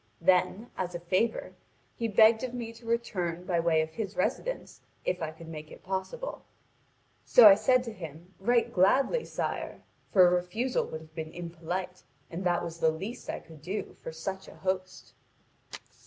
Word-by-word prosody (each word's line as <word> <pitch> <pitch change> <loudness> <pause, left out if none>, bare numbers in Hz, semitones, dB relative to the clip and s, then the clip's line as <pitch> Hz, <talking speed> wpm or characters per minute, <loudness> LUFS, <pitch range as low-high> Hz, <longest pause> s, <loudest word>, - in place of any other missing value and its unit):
Then, 185 +5 +2
as 180 -1 -3
a - - -3
favour, 185 +7 0 0.4
he 230 - -1
begged 220 +2 +6
of 250 -1 -3
me 230 -2 -5
to 230 0 -14
return 180 -7 -1
by 175 -2 0
way 165 -1 +3
of 160 - -7
his 205 +2 -5
residence, - - -2 0.2
if 180 - -1
I 160 - -1
could 160 +1 -11
make 155 -1 -8
it - - -13
possible. 195 - -4 0.8
So 235 -3 +9
I 200 - +11
said 250 +5 +3
to 230 -3 -6
him: 170 0 -10
'Right 235 +4 +2
gladly, 265 - +3
sire!' - - -4 0.3
for 185 -3 +7
a - - +3
refusal 180 +9 0
would 160 - -6
have 155 0 -16
been 160 -1 -5
impolite, 175 +2 -5 0.3
and 175 +3 -4
that 175 -1 +2
was 165 0 -6
the 160 - +4
least 195 +10 -5
I - - -3
could 160 -2 -15
do 190 +7 -4
for - - -6
such 190 +4 -5
a - - -12
host." 185 -1 -3
185 Hz, 180 wpm, -29 LUFS, 170-225 Hz, 0.8 s, I